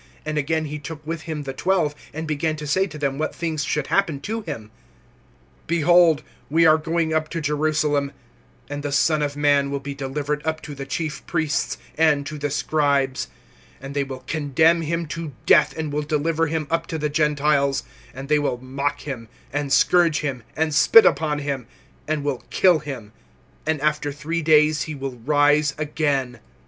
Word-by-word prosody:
And 155 0 -3
again 160 +2 0
he 150 0 -5
took 150 +1 -8
with 165 +1 -4
him 150 -2 -3
the 135 -1 -5
twelve, 170 0 +1 0.2
and 160 +2 -5
began 155 +1 -1
to 150 -1 -7
say 190 +7 +1
to 155 -4 -9
them 140 -1 -2
what 155 - -2
things 160 -3 -2
should 150 -1 -1
happen 170 -6 +1
to 225 +7 -3
him: 110 - -7 1.0
(33)Behold, 170 -1 +4 0.3
we 165 +3 +4
are 155 0 +6
going 160 0 -1
up 155 -1 0
to 170 - -3
Jerusalem; 150 -1 0 0.6
and 145 +1 -5
the 145 0 -3
Son 150 +2 +2
of 145 -1 -2
man 145 -1 +3
will 140 0 -2
be 140 +1 -6
delivered 145 +2 -3
up 160 0 -1
to 150 - -8
the 135 -1 -7
chief 145 0 -3
priests, 160 -4 -1 0.2
and 150 -3 +3
to 150 +1 -6
the 145 0 -1
scribes; 140 -2 0 0.5
and 135 +1 -8
they 140 - +1
will 130 -1 -8
condemn 160 +3 +2
him 165 +2 -2
to 160 -1 -6
death 150 -2 +4
and 155 -2 -3
will 150 - 0
deliver 155 +2 0
him 155 0 -2
up 165 0 0
to 160 - -3
the 150 -1 -1
Gentiles; 145 -2 +1 0.3
(34)and 135 +1 -7
they 150 0 +3
will 145 -4 -1
mock 135 +3 -3
him, 125 -6 -6 0.3
and 145 -1 -2
scourge 170 -1 +4
him, 135 -5 -3
and 160 -1 0
spit 220 +10 +7
upon 150 -2 +2
him, 140 -4 -3 0.4
and 150 -1 -1
will 140 -4 -2
kill 180 -4 +4
him; 130 -8 -7 0.6
and 160 -1 +1
after 150 -1 0
three 155 +4 -3
days 155 -1 +4
he 155 - -4
will 135 -2 -5
rise 145 +2 +3
again. 145 -5 -1
150 Hz, 185 wpm, -23 LUFS, 140-160 Hz, 1.0 s, spit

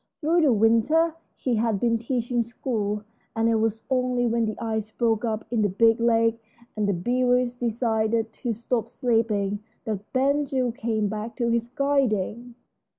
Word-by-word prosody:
Through 335 +2 +2
the 295 -4 +4
winter 230 +10 +3 0.2
he 245 -4 -1
had 220 -2 +1
been 230 0 +1
teaching 240 0 -1
school, 220 -3 -3 0.3
and 225 0 +2
it 230 -1 +3
was 220 0 -1
only 250 -1 +1
when 235 0 +1
the 215 -1 -3
ice 220 -2 -3
broke 225 0 0
up 220 -2 -2
in 235 -2 +1
the 205 - +2
big 225 +4 +3
lake 230 -1 +2 0.3
and 210 -1 0
the - - +2
beavers 245 +5 +1
decided 225 -2 0
to 240 - -3
stop 230 +1 -2
sleeping 220 -5 0 0.3
that 210 -2 -4
Ben 280 +3 +2
Gile 255 -3 0
came 225 -3 -1
back 215 +3 -5
to 235 -2 0
his 235 0 0
guiding. 245 -4 0
230 Hz, 165 wpm, -25 LUFS, 220-245 Hz, 0.3 s, the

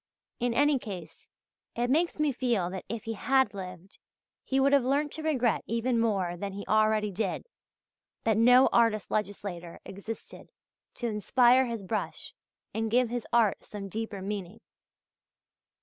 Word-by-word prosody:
In 240 -1 0
any 285 +1 +4
case 185 -8 -9 0.5
it 240 +1 0
makes 335 +4 +2
me 305 -1 +2
feel 235 -9 0
that 190 -1 -6
if 230 0 -4
he 225 - -3
had 265 +4 +2
lived, 185 -1 -9 0.4
he 270 - 0
would 275 +1 +4
have 280 -3 +5
learnt 285 +3 +1
to 320 - -5
regret 260 -8 +1
even 230 +1 0
more 195 -6 0
than 195 +2 -5
he 200 +1 -6
already 215 -1 +2
did, 210 +4 -2 0.8
that 220 -1 +2
no 245 +4 +6
artist 225 -3 +2
legislator 195 -5 -4
existed 200 +4 -8 0.5
to 240 - -5
inspire 240 +4 +4
his 230 -4 -4
brush 210 +3 -4 0.4
and 220 0 -1
give 245 +1 +3
his 245 -2 -3
art 230 -4 +3
some 200 -2 -7
deeper 215 -1 -5
meaning. 200 0 -5
225 Hz, 150 wpm, -29 LUFS, 200-250 Hz, 0.8 s, no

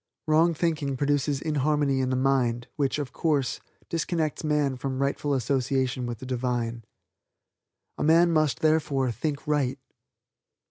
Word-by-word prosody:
Wrong 160 +2 +3
thinking 150 -5 -1
produces 145 0 0
inharmony 145 -2 +1
in 130 -1 0
the 130 - 0
mind, 125 -3 +1
which, 140 -2 0
of 145 -4 -4
course, 145 -6 0 0.3
disconnects 165 -2 -2
man 150 -3 +1
from 130 +1 -4
rightful 140 +1 0
association 130 0 0
with 120 -1 -4
the 130 - -9
Divine. 120 -2 -2 1.2
A - - 0
man 170 +2 +5
must, 155 -6 +1
therefore, 150 -5 +2
think 145 +4 -3
right. 140 -3 0
140 Hz, 135 wpm, -26 LUFS, 130-150 Hz, 1.2 s, man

